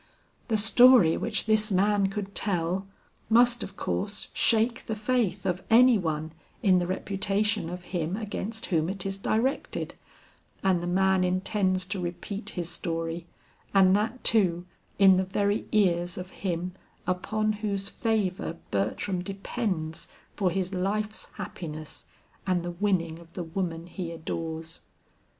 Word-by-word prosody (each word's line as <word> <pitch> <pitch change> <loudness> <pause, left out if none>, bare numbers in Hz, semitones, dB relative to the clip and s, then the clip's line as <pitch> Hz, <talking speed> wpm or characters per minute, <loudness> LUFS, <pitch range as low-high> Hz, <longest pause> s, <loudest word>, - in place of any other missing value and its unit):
The 225 -3 +2
story 220 -4 +7
which 220 -2 -1
this 215 0 +2
man 200 +1 +3
could 195 0 -5
tell, 185 -1 0 0.4
must 240 +1 +5
of 195 - -6
course 205 +1 -2
shake 230 +2 +2
the 220 - -1
faith 215 -4 0
of 180 0 0
any 240 0 +7
one 160 -2 -2 0.3
in 185 -4 +5
the 175 - -1
reputation 200 +1 0
of 180 0 -6
him 175 +2 -1
against 220 +1 -4
whom 165 -2 +1
it 195 -1 -4
is 195 0 -3
directed, 235 +7 -1 0.7
and 185 -3 +3
the 175 - -3
man 190 +1 +3
intends 185 0 +1
to 200 +1 -4
repeat 175 +4 -5
his 175 -2 -2
story, 165 -1 -3 0.5
and 190 -1 +6
that, 225 +5 -1
too, 180 -6 +3 0.3
in 195 -2 +7
the 190 - +2
very 200 +2 0
ears 175 -4 +2
of 180 0 -6
him 180 -1 -3 0.3
upon 215 +4 0
whose 200 -2 -1
favor 200 -6 -1
Bertram 110 - -1
depends 195 -4 -3 0.3
for 195 -3 +1
his 185 +1 -2
life's 210 +3 -2
happiness 155 -3 -7 0.4
and 180 -2 +1
the 175 - -3
winning 170 -3 0
of 170 0 -16
the 180 - -4
woman 165 -1 -3
he 175 -1 -6
adores. 160 0 -5
190 Hz, 140 wpm, -27 LUFS, 175-210 Hz, 0.7 s, story